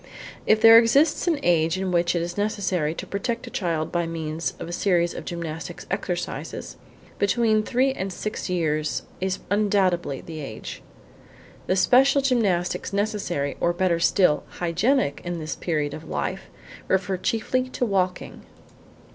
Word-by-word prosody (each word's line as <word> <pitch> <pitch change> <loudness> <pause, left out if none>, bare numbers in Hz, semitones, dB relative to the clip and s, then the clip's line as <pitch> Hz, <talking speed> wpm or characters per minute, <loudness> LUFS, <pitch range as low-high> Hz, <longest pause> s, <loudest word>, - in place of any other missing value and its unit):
If 215 - +5
there 225 0 +10
exists 280 +9 +3
an 325 -4 +2
age 165 -2 +2
in 190 -1 -2
which 175 0 +2
it 170 - 0
is 175 0 -5
necessary 190 -6 -1
to - - -6
protect 230 +4 -3
a - - -10
child 165 -5 -2
by 170 -1 0
means 160 0 -3
of - - -7
a - - -6
series 175 -2 +1
of - - -7
gymnastic 170 0 -5
exercises, 180 -3 -4 0.4
between 215 +1 +3
three 260 +5 +1
and 195 -6 -4
six 210 +2 -4
years 155 -4 -1 0.2
is 190 0 -1
undoubtedly 190 -8 +1
the 160 -2 -8
age. 135 -7 -7 0.9
The 185 - +2
special 270 +7 +4
gymnastics 200 -12 +1
necessary, 200 -8 -1
or, 175 - +2
better 175 -1 +1
still, 170 -2 +3
hygienic, 175 - 0
in 175 0 -3
this 155 -1 -4
period 150 -4 -2
of 155 - -9
life, 190 +1 -3 0.4
refer 190 0 +1
chiefly 255 +6 -1
to 255 - -1
walking. 185 -4 -1
185 Hz, 150 wpm, -24 LUFS, 170-215 Hz, 0.9 s, there